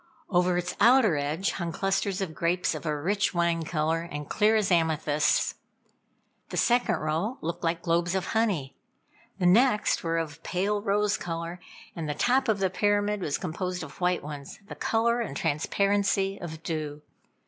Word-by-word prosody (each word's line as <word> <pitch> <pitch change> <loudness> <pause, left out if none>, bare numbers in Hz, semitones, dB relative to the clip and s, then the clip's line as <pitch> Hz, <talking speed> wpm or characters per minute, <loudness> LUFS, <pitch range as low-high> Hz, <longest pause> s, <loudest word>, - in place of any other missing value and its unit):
Over 180 -1 +3
its 180 0 -3
outer 230 -4 +5
edge 150 +7 -1
hung 170 -2 -3
clusters 195 +2 -1
of 180 -5 -3
grapes 170 +3 0
of - - -6
a 150 -1 0
rich 195 +4 0
wine 170 -1 +1
color, 160 0 0
and 150 -4 -6
clear 215 +1 +3
as 210 -3 +1
amethysts. 155 -3 +2 1.0
The - - -5
second 245 0 +3
row 160 +11 -2
looked 170 +2 -4
like 170 0 -1
globes 170 +2 +1
of 190 -1 -1
honey, 195 -12 0 0.6
the 185 - -1
next 210 +4 +4
were 165 0 0
of 160 -2 -3
a - - -32
pale, 200 +5 -1
rose 205 0 +1
color, 170 +1 -5 0.4
and 160 -3 -4
the 150 - -2
top 255 - +2
of 220 -3 +2
the 190 -2 0
pyramid 205 +1 +1
was 150 -5 -1
composed 180 0 -4
of 155 +3 -11
white 180 0 +1
ones, 145 -1 -8
the - - -7
color 235 +1 +1
and 140 -12 -4
transparency 195 +5 +1
of 160 -1 -7
dew. 150 -2 -4
180 Hz, 170 wpm, -27 LUFS, 160-205 Hz, 1.0 s, outer